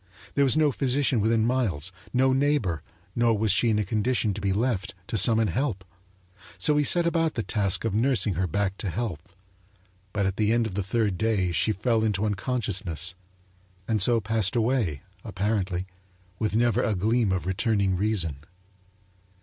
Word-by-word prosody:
There 140 - +3
was 135 +3 +2
no 155 -2 +3
physician 135 -2 +1
within 110 +1 +2
miles, 110 - 0 0.2
no 130 +1 +2
neighbor; 130 - 0 0.3
nor 115 -2 +2
was 110 0 +1
she 115 +5 +3
in 110 - +2
a 105 - 0
condition 110 +1 0
to 105 - -6
be 100 - 0
left, 100 -3 -1
to 110 - -5
summon 110 +2 +4
help. 100 - -2 0.7
So 150 +11 +3
he 150 - +3
set 175 +4 +4
about 165 -1 0
the 115 - -2
task 100 -2 0
of 110 - -1
nursing 115 -2 +2
her 90 +2 -1
back 100 +3 -1
to 100 - -3
health, 90 -3 -5 0.8
but 100 0 -1
at 95 0 -2
the 105 0 +2
end 115 -1 +2
of 110 - -5
the 100 - -1
third 100 -1 -1
day 105 -5 +1
she 95 +6 +1
fell 110 +2 0
into 105 -1 0
unconsciousness 95 - -2 0.7
and 110 -3 0
so 115 +4 +3
passed 110 -1 0
away, 115 - 0 0.2
apparently, 100 -3 -2 0.5
with 110 -1 -1
never 120 +1 +2
a 110 - 0
gleam 110 +2 +1
of 90 -3 -1
returning 100 0 0
reason. 90 -7 0
110 Hz, 175 wpm, -26 LUFS, 95-120 Hz, 0.8 s, summon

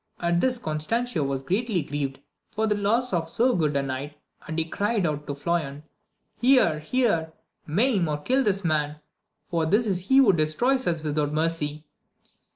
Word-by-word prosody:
At 170 0 +1
this 255 -1 +2
Constancio 170 +3 -2
was 135 -1 -2
greatly 195 - -1
grieved 140 -2 -4 0.3
for 220 +1 -1
the 215 - +2
loss 210 +4 0
of 165 -2 -1
so 245 +6 +2
good 150 -4 +1
a 140 - 0
knight, 135 +2 -5 0.3
and 160 - -4
he 165 - 0
cried 205 +3 -1
out 150 -2 -3
to 140 - -3
Floyan, 150 -2 -2 0.6
Here! 245 - +4
here! 165 -3 0 0.3
maim 200 - +2
or 150 -1 -1
kill 260 - +1
this 200 -4 0
man! 150 -2 0 0.6
for 165 -2 +1
this 210 +7 +3
is 190 -3 -2
he 265 - +4
who 255 -8 +6
destroys 240 - +1
us 165 -3 0
without 150 -1 -1
mercy 155 -1 -1
165 Hz, 170 wpm, -25 LUFS, 150-220 Hz, 0.6 s, who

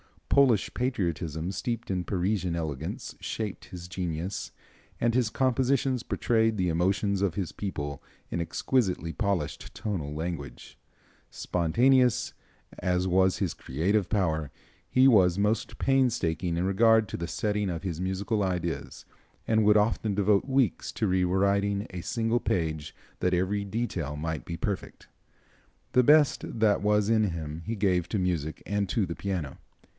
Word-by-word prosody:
Polish 130 -7 +4
patriotism 85 - -2
steeped 115 +4 -3
in 90 -2 -1
Parisian 95 -2 -1
elegance 80 -2 -4
shaped 105 -3 -4
his 90 -2 -9
genius, 90 +1 -4 0.5
and 120 0 +2
his 120 -3 +2
compositions 130 0 +1
portray 115 -3 +1
the 95 -5 0
emotions 95 +4 +1
of 95 -5 0
his 95 -4 -2
people 75 -8 -5 0.3
in - - -1
exquisitely 90 -2 0
polished 100 -8 -2
tonal 80 -9 -3
language. 75 -6 -6 0.5
Spontaneous 125 +8 +2 0.5
as 90 0 0
was 95 0 +3
his 95 -6 -1
creative 90 +8 0
power 80 -8 0 0.4
he 130 +1 +4
was 95 -8 +5
most 105 +2 0
painstaking 95 -11 +1
in 85 - 0
regard 110 +3 +4
to - - -4
the 85 - -4
setting 105 +4 -1
of 85 0 -4
his 90 -3 -3
musical 100 +3 -1
ideas 90 -3 -3 0.4
and 110 -1 +3
would 105 0 +6
often 105 -1 +1
devote 100 0 +3
weeks 130 - +1
to 110 - 0
re 90 -1 +2
writing 100 +2 +1
a 90 -2 -5
single 115 +3 0
page 80 -7 -2 0.2
that 90 - +1
every 95 +3 0
detail 95 -9 -3
might 80 +1 -4
be 85 -2 -5
perfect. 100 +1 -4 0.8
The 125 - +5
best 145 -4 +3
that 105 -2 +4
was 105 0 +2
in 110 -1 +4
him 80 -4 -4
he 115 - -2
gave 95 -4 +1
to 110 - -1
music 85 -5 -2
and 100 -2 -1
to 100 +3 +1
the 85 -1 -5
piano. 90 -8 -4
95 Hz, 145 wpm, -28 LUFS, 85-110 Hz, 0.8 s, would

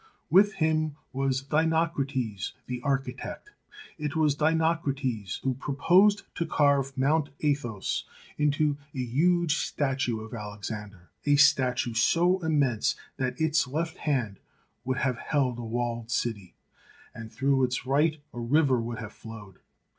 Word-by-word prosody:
With 200 +4 +6
him 155 -3 0 0.2
was 135 0 0
Dinocrates, 140 - 0
the 125 -1 -5
architect. 135 - -3 0.5
It 150 -1 -3
was 155 -2 +3
Dinocrates 145 - 0
who 130 - +1
proposed 175 - +3
to 170 - -2
carve 140 -3 +2
Mt. 145 +3 +2
Athos 130 -9 -1 0.3
into 150 0 +1 0.2
a - - -6
huge 155 +6 +2
statue 135 -5 -1
of 110 +1 -9
Alexander, 105 -3 -7 0.2
a 145 - +5
statue 130 -4 +3
so 175 +10 +3
immense 145 -8 +1 0.2
that 130 +2 -2
its 160 -3 +2
left 160 +5 -3
hand 120 -10 -1 0.5
would 130 0 -1
have 130 -3 0
held 130 -5 0
a - - -5
walled 115 0 -3
city, 110 -6 -2 0.6
and 115 -1 -9
through 135 -1 +1
its 125 0 -1
right 150 +4 +2
a 120 - -6
river 130 +1 +2
would 115 0 -4
have 110 -3 -7
flowed. 105 -4 -11
135 Hz, 130 wpm, -28 LUFS, 120-155 Hz, 0.6 s, With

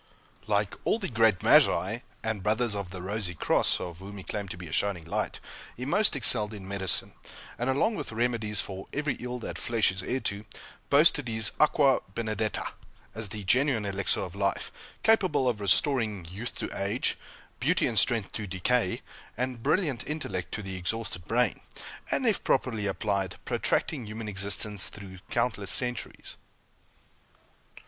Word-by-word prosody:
Like 105 -1 +1
all - - +2
the 205 - -3
great 110 -5 +3
Magi, 95 +8 +5 0.2
and 110 -3 -1
Brothers 110 +3 +1
of 100 -3 -4
the 90 -1 -7
Rosy 95 -2 -3
Cross, - - +2
of 85 -1 -6
whom 100 +2 -8
he 95 - -8
claimed 100 -1 -4
to 85 - -6
be 90 - -8
a 80 - -8
shining 90 -2 0
light, 80 - -2 0.4
he 125 - -4
most 205 +5 +3
excelled 110 -4 0
in 95 -2 -9
medicine; 95 -3 -1 0.5
and 120 +2 0
along 145 +13 +2
with 210 - -4
remedies 115 -3 0
for 95 -1 -7
"every 150 0 0
ill 125 0 -4
that 120 - -5
flesh 115 -4 +2
is 95 +1 -5
heir 125 +7 -1
to," 100 +1 -2 0.5
boasted 145 -1 +5
his 110 -2 +3
"Aqua 145 -3 +5 0.2
Benedetta" 110 -1 -1 0.5
as 110 -1 0
the 105 0 -6
genuine 120 +2 +3
elixir 100 -1 +1
of 90 -3 -5
life, 100 0 -1 0.3
capable 185 -12 +4
of 115 -4 0
restoring 105 - +2
youth 100 +8 -6
to - - -4
age, 100 +6 0 0.4
beauty - - +2
and - - +3
strength 115 -5 +2
to 105 -2 -4
decay, 95 +3 0 0.3
and 125 -1 -2
brilliant 150 -4 +1
intellect 100 - -3
to 105 - -3
the 95 -1 -5
exhausted 90 -2 -3
brain; 120 -2 +2 0.5
and, - - 0
if - - +2
properly 110 -5 +1
applied, 100 -1 -1
protracting 130 -8 0
human 110 +1 -6
existence 100 0 -1
through 95 -3 -10
countless 115 -5 0
centuries. 125 +4 -1
110 Hz, 160 wpm, -29 LUFS, 95-125 Hz, 0.5 s, Magi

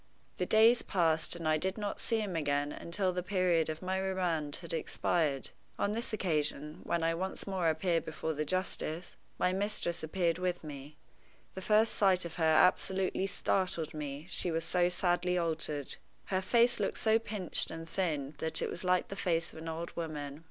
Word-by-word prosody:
The 180 - -1
days 225 +2 +6
passed, 165 -4 +1
and 165 -2 -4
I 155 0 +3
did 190 +5 -2
not 205 -1 -3
see 225 -1 0
him 200 -4 -3
again 145 -2 0
until 185 +4 -1
the 180 - -1
period 180 -4 +1
of 155 +3 -5
my 190 +1 -1
remand 175 -6 0
had 170 -1 -4
expired. 155 -3 0 0.3
On 200 - 0
this 230 +3 -2
occasion, 150 -6 0
when 170 -1 -1
I 165 0 +2
once 190 +3 -3
more 185 -4 0
appeared 165 +1 +1
before 160 0 -3
the 155 0 -1
justice, 175 0 -2 0.2
my 180 - +1
mistress 195 -3 -2
appeared 170 +1 0
with 180 -1 -1
me. 145 -1 -8 0.6
The 190 - -6
first 215 +3 +3
sight 185 -3 +3
of 170 - -7
her 165 - 0
absolutely 185 +4 +3
startled 185 -4 -1
me, 145 -1 -5
she 180 - +3
was 165 0 -1
so 175 +1 +2
sadly 180 0 +1
altered. 155 -4 -1 0.4
Her 185 - +2
face 235 +4 +3
looked - - -1
so 220 0 +3
pinched 210 -5 -1
and 165 0 -7
thin 155 -7 -2
that 160 0 0
it - - -2
was 170 - -6
like 180 0 +2
the 195 - -5
face 165 -4 0
of - - -9
an 165 +1 -6
old 165 +1 -5
woman. 150 -3 -5
175 Hz, 185 wpm, -32 LUFS, 160-190 Hz, 0.6 s, days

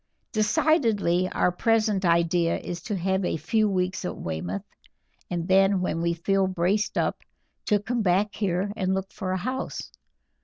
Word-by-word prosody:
"Decidedly 210 - +2
our 180 - +2
present 215 0 +1
idea 170 0 +2
is 175 - -6
to 215 -2 -3
have 190 +1 0
a 180 - 0
few 215 +5 +1
weeks 185 0 -1
at 180 - -4
Weymouth, 90 +4 -4 0.7
and 175 -1 -3
then 195 0 +4
when 175 -2 -1
we 170 0 0
feel 195 +3 +1
braced 190 +3 0
up - - 0 0.5
to 210 - +3
come 235 +3 -2
back 195 +1 +2
here 195 0 -1
and 190 -2 0
look 190 0 -4
for 185 - -4
a 185 - 0
house. 255 +7 -4
190 Hz, 160 wpm, -26 LUFS, 175-210 Hz, 0.7 s, then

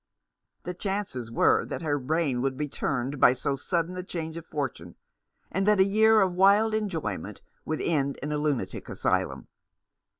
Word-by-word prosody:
The 180 - -4
chances 190 - -4
were 115 - +3
that - - -6
her 145 -2 0
brain 140 -2 0
would 135 0 -1
be 150 +1 -2
turned 135 0 -2
by - - +7
so 140 +2 -2
sudden 170 +5 -2
a - - -2
change 165 -3 -5
of 165 - -6
fortune, 130 - -5 0.6
and 195 +2 0
that 210 -2 +4
a - - +8
year 220 +2 +5
of 190 -2 +2
wild 200 +4 +4
en 215 -1 0
joyment 105 - -4 0.2
would 155 - -2
end 140 -4 0
in 150 - -3
a 150 - -1
lunatic 145 -10 -2
asylum. - - -1
160 Hz, 175 wpm, -27 LUFS, 135-190 Hz, 0.6 s, a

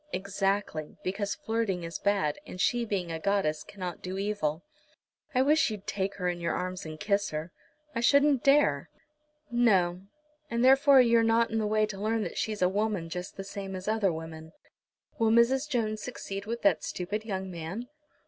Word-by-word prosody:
"Exactly; 195 -5 -2
because 200 +2 -2
flirting 225 - -2
is 165 0 -5
bad, 195 -7 +1
and 180 - -9
she 240 +4 +2
being 190 -6 -2
a 160 - -3
goddess 175 -5 0
cannot 185 -4 -7
do 185 +1 -5
evil. 195 -6 -1 0.7
I 255 - +5
wish 300 +1 +4
you'd 210 -3 -6
take 195 0 -2
her 180 -2 -2
in 175 -1 -1
your 170 - -1
arms 185 -1 -4
and 155 0 -8
kiss 205 -1 +1
her." 155 +3 -5 0.4
"I 235 - -2
shouldn't 280 +2 +4
dare." 275 - +3 0.6
"No; 190 -7 +3 0.5
and 235 +1 +1
therefore 270 0 +7
you're 235 -1 +4
not 225 0 +3
in 225 - 0
the 215 - 0
way 215 0 +2
to 200 -2 -7
learn 220 +1 0
that - - -4
she's 215 -3 -1
a - - +5
woman 200 -3 -1
just 180 +3 -6
the 195 - -4
same 195 -1 -6
as 185 +1 -7
other 215 -3 +2
women. 160 0 -8 0.7
Will 225 -1 +3
Mrs. 255 +6 +3
Jones 215 -5 -1
succeed 200 -4 -6
with 235 +1 -4
that 180 -6 +3
stupid 205 +4 -3
young 190 -3 -4
man?" 175 +8 -6
200 Hz, 185 wpm, -29 LUFS, 180-225 Hz, 0.7 s, therefore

